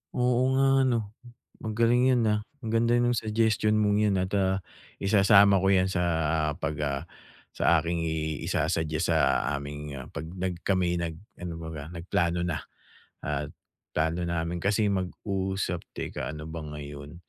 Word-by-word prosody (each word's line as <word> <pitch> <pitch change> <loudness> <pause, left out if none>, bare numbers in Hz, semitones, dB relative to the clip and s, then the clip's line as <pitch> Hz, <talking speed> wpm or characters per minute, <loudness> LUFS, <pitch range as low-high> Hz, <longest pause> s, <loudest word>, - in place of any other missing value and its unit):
Oo 125 0 +2
nga, 135 0 +4 0.2
'no. 110 -4 -1 0.5
Magaling 115 +3 +3
'yon, 125 -2 +3
ah. 105 -1 +2 0.3
Ang 110 - -2
ganda 115 +1 +3
no'ng 120 0 +3
suggestion 110 -1 +2
mong 105 -1 +3
'yon 105 -2 +3
at, 95 +1 -2
ah, 95 -1 +2 0.4
isasama 100 -1 +5
ko 95 - +3
'yan 95 -1 +4
sa 95 -2 -1 0.6
pag 75 - -2
ah, 70 -2 -1 0.5
sa 85 - +4
aking 85 +1 -2
i 80 -2 -2
isa-suggest 80 -1 0
sa 70 -6 +3
aming, 75 +1 -5
ah, 65 - -11
'pag - - -6
nag 90 -1 -3
kami'y 90 -3 +2
nag 85 -1 -2 0.2
ano 90 -1 -5
baga, 80 0 -7
nagplano 85 0 0
na 85 -3 -1 0.7
at 75 0 -2 0.5
plano 80 +3 0
namin 85 0 -2
kasi 100 +3 +2
mag-usap 95 -1 -2 0.2
Teka, - - -4
ano 75 - -7
ba 80 - -5
ngayon? 75 0 -8
90 Hz, 155 wpm, -28 LUFS, 80-105 Hz, 0.7 s, isasama